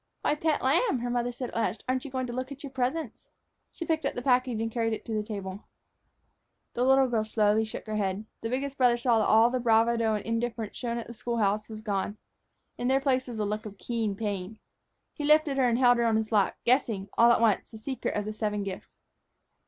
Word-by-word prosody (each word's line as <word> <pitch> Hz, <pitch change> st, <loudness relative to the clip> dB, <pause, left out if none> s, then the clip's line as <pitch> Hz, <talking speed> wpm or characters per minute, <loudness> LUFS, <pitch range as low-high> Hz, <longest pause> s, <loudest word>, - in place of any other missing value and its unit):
"Why, -, -, +2 dB
pet 310 Hz, 0 st, 0 dB
lamb," 310 Hz, -, +3 dB
her 245 Hz, 0 st, -2 dB
mother 245 Hz, 0 st, 0 dB
said 245 Hz, +1 st, -5 dB
at -, -, -12 dB
last, 225 Hz, -1 st, -1 dB
"aren't 255 Hz, 0 st, 0 dB
you -, -, -5 dB
going 260 Hz, -1 st, -2 dB
to 240 Hz, -, -6 dB
look 255 Hz, +2 st, -4 dB
at 280 Hz, +1 st, -9 dB
your 280 Hz, -, -7 dB
presents?" 260 Hz, 0 st, -3 dB, 0.4 s
She 335 Hz, -, -6 dB
picked 320 Hz, -1 st, 0 dB
up 275 Hz, -, -1 dB
the 245 Hz, -, -4 dB
package 250 Hz, -3 st, +2 dB
and 225 Hz, 0 st, -2 dB
carried 225 Hz, -1 st, 0 dB
it -, -, -6 dB
to 225 Hz, -, -4 dB
the 215 Hz, -, 0 dB
table. 200 Hz, -2 st, -6 dB, 1.1 s
The 245 Hz, -, 0 dB
little 265 Hz, +1 st, +5 dB
girl 230 Hz, -3 st, 0 dB
slowly 215 Hz, 0 st, +2 dB
shook 215 Hz, -, -7 dB
her 215 Hz, -1 st, -3 dB
head. 200 Hz, +1 st, -1 dB, 0.2 s
The 225 Hz, -, -3 dB
biggest 275 Hz, +2 st, -3 dB
brother 245 Hz, -2 st, +4 dB
saw 235 Hz, -1 st, +2 dB
that 215 Hz, -, +2 dB
all 225 Hz, +2 st, +5 dB
the 255 Hz, -, 0 dB
bravado 230 Hz, -1 st, +3 dB
and 210 Hz, -, -4 dB
indifference 230 Hz, -1 st, -2 dB
shown 235 Hz, -2 st, -3 dB
at 235 Hz, -, -4 dB
the 235 Hz, -, -9 dB
school 235 Hz, +1 st, -3 dB
house 210 Hz, 0 st, 0 dB
were 220 Hz, -, -7 dB
gone. 210 Hz, -1 st, -3 dB, 0.6 s
In 245 Hz, -, -1 dB
their 265 Hz, +1 st, +3 dB
place 260 Hz, -2 st, +1 dB
was 240 Hz, -2 st, -6 dB
a 210 Hz, -, 0 dB
look 210 Hz, +1 st, -3 dB
of 200 Hz, -1 st, -11 dB
keen 225 Hz, -3 st, -2 dB
pain. 205 Hz, -1 st, -4 dB, 0.6 s
He 295 Hz, -, -6 dB
lifted 300 Hz, -1 st, +4 dB
her 255 Hz, -2 st, +3 dB
and 235 Hz, -, +1 dB
held 245 Hz, -1 st, +5 dB
her 235 Hz, -, +2 dB
on 225 Hz, -1 st, +2 dB
his 220 Hz, 0 st, -2 dB
lap, 205 Hz, -3 st, +2 dB
guessing, 235 Hz, -6 st, +2 dB
all 235 Hz, +1 st, +6 dB
at 235 Hz, -, +4 dB
once, 225 Hz, -3 st, +2 dB
the 220 Hz, -, -10 dB
secret 260 Hz, +4 st, -4 dB
of 205 Hz, -, -2 dB
the 215 Hz, -, -4 dB
seven 210 Hz, -1 st, -2 dB
gifts. 195 Hz, -1 st, -7 dB
235 Hz, 240 wpm, -28 LUFS, 215-255 Hz, 1.1 s, all